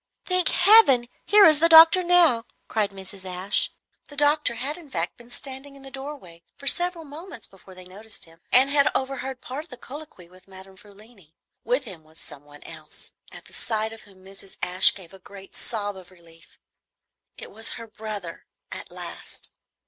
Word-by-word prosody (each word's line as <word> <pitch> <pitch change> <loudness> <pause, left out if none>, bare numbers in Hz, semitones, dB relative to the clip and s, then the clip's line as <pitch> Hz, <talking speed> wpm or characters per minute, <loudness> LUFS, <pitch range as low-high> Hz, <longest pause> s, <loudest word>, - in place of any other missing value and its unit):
"Thank 365 -1 +1
Heaven! 355 - +6 0.2
here 410 0 +6
is 310 -2 +6
the 335 +1 +6
doctor 325 +3 +8
now," 345 -10 +5 0.2
cried 215 -2 -1
Mrs. 195 0 -11
Ashe. 185 +2 -1 0.4
The 290 - -11
doctor 295 -3 +3
had 270 +6 -2
in 335 -5 -13
fact 170 -6 -3
been 240 0 -18
standing 270 +2 -10
in 275 - -16
the 270 - -11
doorway 270 - -10 0.2
for 280 - -14
several 350 +2 +2
moments 300 - -10
before 190 -1 -16
they 185 0 -13
noticed 205 +4 -12
him, 165 0 -21
and 265 +2 +4
had 280 -1 +4
overheard 265 -1 -4
part 275 +5 -7
of - - -23
the 250 - -11
colloquy 280 - -12
with 185 +2 -21
Madame 190 0 -14
Frulini. 200 -4 -20 0.3
With 250 +4 -1
him 185 -9 -9
was 155 +1 -18
some 145 - -10
one 145 0 -16
else, - - -13 0.2
at - - -13
the - - -19
sight 220 -1 -3
of 225 - -13
whom 190 -2 -20
Mrs. 195 0 -8
Ashe 180 +1 +5
gave 185 -3 -13
a 195 - -14
great 195 +1 -14
sob 205 -3 -4
of 185 -2 -14
relief. 165 -2 -21 0.8
It - - -10
was 220 +2 -8
her 230 - -8
brother, 210 -5 -9 0.2
at - - -8
last. - - -9
225 Hz, 185 wpm, -24 LUFS, 190-285 Hz, 0.8 s, doctor